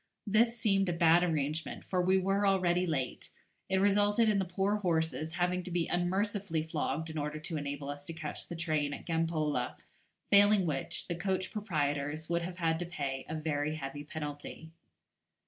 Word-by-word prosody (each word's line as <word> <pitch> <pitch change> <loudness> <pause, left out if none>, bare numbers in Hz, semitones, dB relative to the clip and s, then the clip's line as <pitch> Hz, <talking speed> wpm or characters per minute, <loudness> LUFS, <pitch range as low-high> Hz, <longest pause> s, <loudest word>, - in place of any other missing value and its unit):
This 230 +3 +3
seemed 195 -4 +2
a - - +1
bad 170 0 +5
arrangement, 155 -1 -1
for 185 -1 0
we 185 +2 +4
were 195 +2 +2
already 180 -2 +2
late; 135 -6 -2 0.4
it 190 - +2
resulted 205 +3 +4
in 205 -2 +3
the 190 - 0
poor 195 +3 0
horses 160 -4 -1
having 180 +1 +1
to 180 - -8
be 175 -1 0
unmercifully 190 -1 0
flogged 160 0 -2
in 155 - -3
order 150 +1 -3
to 160 +1 -4
enable 145 -1 -4
us 145 0 -5
to 165 - -5
catch 155 -2 -6
the 170 - -6
train 155 -4 0
at - - -11
Gampola, 160 -6 0 0.6
failing 205 -1 +6
which, 145 -5 -2
the 175 - -1
coach 185 +2 -1
proprietors 155 -6 -2
would 170 0 +1
have 175 +1 -5
had 165 -2 +1
to 175 - -2
pay 140 -6 -4
a 160 - -2
very 155 -1 -1
heavy 145 -1 -5
penalty. 150 +1 -7
165 Hz, 180 wpm, -32 LUFS, 150-190 Hz, 0.6 s, failing